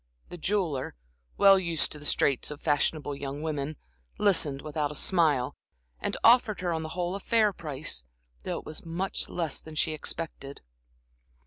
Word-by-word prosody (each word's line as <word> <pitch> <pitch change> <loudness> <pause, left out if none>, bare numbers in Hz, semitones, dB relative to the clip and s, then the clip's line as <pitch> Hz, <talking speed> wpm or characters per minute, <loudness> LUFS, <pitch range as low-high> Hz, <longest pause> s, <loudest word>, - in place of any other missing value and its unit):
The 175 - -7
jeweler, 165 - -1 0.4
well 195 -1 +7
used 170 -3 0
to 150 - -6
the 150 - -10
straits 140 -3 +2
of 150 -1 -5
fashionable 145 -1 0
young 140 +1 -5
women, 150 -1 -3 0.4
listened 155 -9 +2
without 150 -1 -1
a 150 - -7
smile, 150 -8 +2 0.4
and - - -2
offered 230 -4 +5
her 175 -2 0
on 160 - -1
the 160 - -5
whole 175 0 -1
a 200 - -3
fair 215 -1 +3
price, 150 - -3 0.4
though - - -3
it - - -8
was 155 - -6
much 175 +4 -2
less 165 -5 0
than 160 -1 -11
she 155 - +1
expected. 155 -2 -5
155 Hz, 165 wpm, -28 LUFS, 145-180 Hz, 0.4 s, well